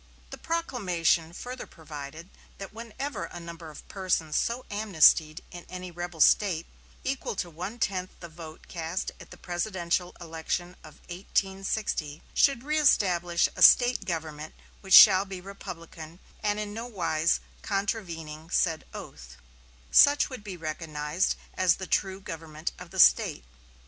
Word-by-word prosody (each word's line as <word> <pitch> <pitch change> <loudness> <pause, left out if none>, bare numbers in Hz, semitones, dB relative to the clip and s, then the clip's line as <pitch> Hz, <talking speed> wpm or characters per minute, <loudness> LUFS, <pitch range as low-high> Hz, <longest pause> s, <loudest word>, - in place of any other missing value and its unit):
The - - -7
proclamation 180 - 0
further 250 +8 -7
provided 155 +2 -10 0.3
that 195 0 -8
whenever 235 +5 -5
a 175 - -9
number 170 -1 -9
of 150 - -12
persons 180 -5 -1
so 240 +2 -1
amnestied 165 -6 +4
in 175 -1 -9
any 185 0 -7
rebel 175 -1 -6
State, 175 -4 +4 0.4
equal 265 -5 -3
to 175 -3 -4
one 180 +8 -6
tenth 185 -5 -1
the 170 - -8
vote 160 -1 -11
cast 165 +1 -4
at - - -13
the - - -12
presidential 175 -1 -2
election 170 +2 -4
of 155 -1 -13
1860, 190 -4 -2
should 275 -4 +3
"reëstablish 190 - +3
a - - -7
State 245 -4 +6
government 155 -4 -5 0.2
which 190 -2 +4
shall 190 -2 +10
be 190 -2 -7
republican, 170 -4 -9 0.2
and 210 0 0
in 210 -1 -4
no 230 +2 -5
wise 170 -7 +1 0.2
contravening 170 -6 -3
said 165 -2 +1
oath," - - -10 0.5
such 285 0 +6
would 255 -5 -8
be 195 -4 -7
recognized 155 +1 -2 0.2
as 180 -2 +3
the 190 - -6
true 190 0 0
government 160 -3 -6
of - - -10
the - - -7
State. 60 +1 +5
175 Hz, 140 wpm, -28 LUFS, 160-200 Hz, 0.5 s, shall